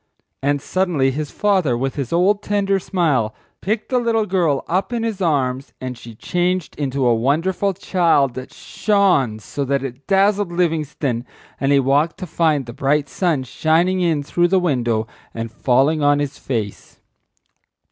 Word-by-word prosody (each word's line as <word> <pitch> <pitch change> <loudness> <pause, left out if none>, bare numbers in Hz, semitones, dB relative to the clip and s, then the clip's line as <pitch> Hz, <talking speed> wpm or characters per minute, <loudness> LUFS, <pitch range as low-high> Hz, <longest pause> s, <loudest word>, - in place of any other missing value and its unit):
And 145 0 0
suddenly 175 -8 +1
his 150 +2 -4
father, 185 -12 +1
with 135 +2 -2
his 140 -5 -4
old 195 +4 +2
tender 200 -1 0
smile, 155 - 0 0.3
picked 215 +2 -2
the 255 - +2
little 230 -2 +1
girl 175 -8 0
up 190 +6 -1
in 235 -2 -2
his 220 -4 -3
arms 135 -6 0
and 130 -1 -5
she 115 -1 -12
changed 180 +6 -1
into 135 -2 -1
a 120 - +4
wonderful 165 - +1
child 170 -8 +2
that 130 +1 -8
shone 190 - +1
so 140 +6 -5
that 140 0 0
it 135 +1 -7
dazzled 195 -1 +2
Livingstone 155 -8 -1 0.4
and—he 140 0 +3
waked 145 +5 +1
to - - -6
find 155 -6 +1
the 120 - -8
bright 140 +1 0
sun 165 -8 0
shining 165 +8 +1
in 160 -5 +1
through 175 +4 +1
the 190 +1 +3
window 120 -10 0 0.3
and 115 0 -4
falling 135 +7 +2
on 145 0 +4
his 145 -1 -3
face. 110 -6 -5
150 Hz, 160 wpm, -20 LUFS, 135-185 Hz, 0.4 s, a